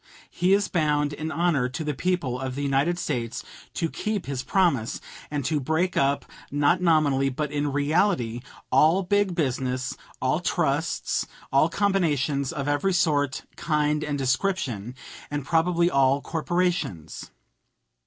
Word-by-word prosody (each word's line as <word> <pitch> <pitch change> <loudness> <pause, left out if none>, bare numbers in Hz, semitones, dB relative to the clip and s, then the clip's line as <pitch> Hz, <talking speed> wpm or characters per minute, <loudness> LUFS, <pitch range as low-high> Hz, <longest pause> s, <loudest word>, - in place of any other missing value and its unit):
He 180 +2 +2
is 200 0 +3
bound 150 -4 +1
in 155 +2 -4
honor 160 -8 +1
to 130 +5 -4
the 150 -1 -1
people 145 -4 -1
of 130 -1 -4
the 145 - -3
United 140 +5 +1
States 125 -7 -3 0.3
to 165 - 0
keep 210 +2 -3
his 135 -2 -3
promise, 140 - +1 0.3
and 145 -3 -3
to 150 +1 +1
break 160 +6 0
up, 140 +1 +1 0.2
not 145 +5 +2
nominally 150 -6 +3
but 145 +2 -3
in 145 -1 -1
reality, 145 - +1 0.3
all 160 +8 +4
big 205 0 +1
business, 130 -4 -1 0.2
all - - +1
trusts, - - 0 0.3
all 140 +4 +4
combinations 150 -8 +1
of 140 -1 -4
every 145 +7 +1
sort, 145 -6 +1
kind, 150 -2 0
and 145 -1 -2
description, 130 - -1 0.3
and 145 -2 -3
probably 170 +2 +2
all 135 0 +3
corporations. 165 - -2
150 Hz, 140 wpm, -25 LUFS, 135-175 Hz, 0.3 s, all